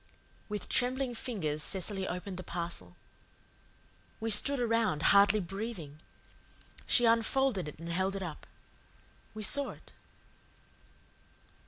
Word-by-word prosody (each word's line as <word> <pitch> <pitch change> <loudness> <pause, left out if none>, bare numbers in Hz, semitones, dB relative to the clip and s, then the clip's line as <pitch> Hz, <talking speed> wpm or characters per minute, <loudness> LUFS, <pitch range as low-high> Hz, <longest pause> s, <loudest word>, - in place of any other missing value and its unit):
With 210 -2 -4
trembling 255 0 +1
fingers 185 - -3
Cecily 190 +3 -1
opened 180 +1 -5
the 185 - -6
parcel. 170 - -5 1.2
We 225 0 -2
stood 270 +6 +4
around, 230 -9 +1
hardly 200 +1 +6
breathing. 190 -5 -6 0.9
She 240 - +5
unfolded 230 - +2
it 150 - -8
and 165 +2 -8
held 190 +3 0
it 195 - -4
up. 160 -4 -7 0.9
We 215 - -5
saw 280 +7 +4
it. - - -13
200 Hz, 115 wpm, -31 LUFS, 175-230 Hz, 1.2 s, hardly